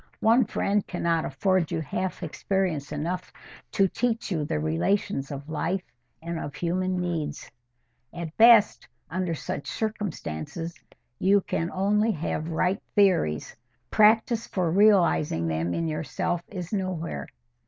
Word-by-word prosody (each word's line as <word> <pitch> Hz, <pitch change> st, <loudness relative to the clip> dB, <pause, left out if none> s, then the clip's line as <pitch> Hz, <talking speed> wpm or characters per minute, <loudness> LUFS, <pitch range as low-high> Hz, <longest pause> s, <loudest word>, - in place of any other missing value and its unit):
One 230 Hz, +2 st, +5 dB
friend 205 Hz, -1 st, 0 dB
cannot 170 Hz, -2 st, 0 dB
afford 180 Hz, +4 st, +1 dB
you -, -, -1 dB
half 185 Hz, +5 st, -3 dB
experience 170 Hz, -3 st, -1 dB
enough 170 Hz, +5 st, -3 dB, 0.4 s
to 195 Hz, -, +4 dB
teach 230 Hz, +2 st, -1 dB
you 160 Hz, -4 st, 0 dB
the 110 Hz, -, -1 dB
relations 85 Hz, -, 0 dB
of 140 Hz, 0 st, -7 dB
life 170 Hz, +4 st, -2 dB, 0.4 s
and 170 Hz, 0 st, -3 dB
of 145 Hz, -, -6 dB
human 185 Hz, +1 st, -1 dB
needs. 170 Hz, -4 st, -3 dB, 0.6 s
At 170 Hz, -2 st, -6 dB
best, 225 Hz, -, +6 dB, 0.2 s
under 180 Hz, -1 st, -1 dB
such 145 Hz, -, -5 dB
circumstances, 170 Hz, -, -4 dB, 0.5 s
you 200 Hz, +2 st, +4 dB
can 165 Hz, -2 st, -2 dB
only 210 Hz, +3 st, +2 dB
have 155 Hz, 0 st, -3 dB
right 180 Hz, +5 st, 0 dB
theories: 180 Hz, -, +2 dB, 0.4 s
practice 225 Hz, +2 st, +4 dB
for 180 Hz, -4 st, 0 dB
realising 180 Hz, -, +4 dB
them 80 Hz, +2 st, -1 dB
in 165 Hz, -, -1 dB
yourself 155 Hz, +2 st, -2 dB
is 180 Hz, -1 st, -6 dB
nowhere. 175 Hz, -, -3 dB
175 Hz, 130 wpm, -26 LUFS, 155-200 Hz, 0.6 s, best